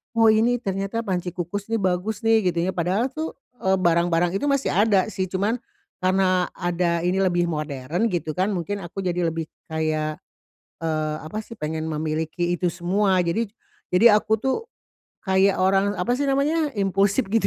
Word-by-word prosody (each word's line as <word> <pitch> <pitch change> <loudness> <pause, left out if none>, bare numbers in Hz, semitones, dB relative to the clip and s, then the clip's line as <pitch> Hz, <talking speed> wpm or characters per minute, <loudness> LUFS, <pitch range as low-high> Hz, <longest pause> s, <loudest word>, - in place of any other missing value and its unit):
"oh 225 -1 +5
nih 235 +3 +3
ternyata 195 +1 -2
panci 180 -2 -2
kukus 190 +5 -5
nih 225 - +1
bagus 190 +3 -1
nih" 220 -5 +3
gitu 170 - -2
ya. 190 - +1
Padahal 185 +7 +1
tuh, 315 +3 -4 0.3
eee, 190 -1 +2
barang-barang 170 0 +2
itu 195 - -2
masih 275 -1 +1
ada 200 -2 +3
sih, 205 -3 -3
cuman 200 +5 +1 0.5
karena 185 -1 +2
ada 175 -1 0
ini 190 +2 +2
lebih 175 -2 +2
modern 155 - -2
gitu 160 -4 -2
kan, 190 +3 +1
mungkin 195 +2 -3
aku 175 +3 -7
jadi 180 -2 -1
lebih 165 -1 -4 0.2
kayak, 155 -1 -1 0.6
eee, 155 -1 -1
apa 160 +7 -5
sih? 225 +1 -9
Pengen 160 -3 -3
memiliki 160 +2 -2
itu 180 0 0
semua. 185 +2 +1
Jadi 180 +7 0 0.4
jadi 210 +4 +7
aku 220 +1 +1
tuh 265 +4 0 0.7
kayak 190 0 +3
orang 195 +2 +3
apa 245 +3 0
sih 285 - 0
namanya 290 +2 +1
impulsif 200 +3 +1
gitu. 220 -2 +2
185 Hz, 170 wpm, -23 LUFS, 170-210 Hz, 0.7 s, jadi